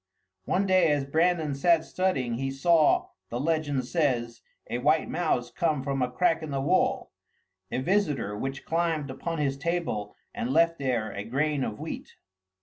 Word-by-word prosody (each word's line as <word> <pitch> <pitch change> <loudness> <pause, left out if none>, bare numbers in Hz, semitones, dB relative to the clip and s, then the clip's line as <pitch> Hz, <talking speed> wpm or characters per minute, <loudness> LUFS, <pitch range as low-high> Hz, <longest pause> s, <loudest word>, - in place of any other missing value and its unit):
One 195 +2 +1
day 185 -4 +4
as 145 -2 +1
Brandan 160 +1 +1
sat 165 +3 +3
studying, 130 -11 -1
he 135 0 -1
saw, 155 +3 +3 0.2
the 120 - -3
legend 145 -3 0
says, 125 -6 0 0.3
a 120 - -2
white 155 +5 +2
mouse 155 -8 -1
come 155 -6 0
from 135 -1 -1
a 125 - +1
crack 165 +4 +1
in 155 - -6
the 135 -1 -2
wall, 140 +1 +1 0.6
a - - -1
visitor 150 - 0
which 135 +5 -5
climbed 160 -4 0
upon 165 +5 -4
his 140 -2 -1
table 160 -11 -2 0.2
and 120 - -3
left 165 +3 +3
there 120 -6 -1
a 100 0 -5
grain 140 +5 0
of 105 -3 -3
wheat. - - -7
145 Hz, 165 wpm, -27 LUFS, 130-165 Hz, 0.6 s, day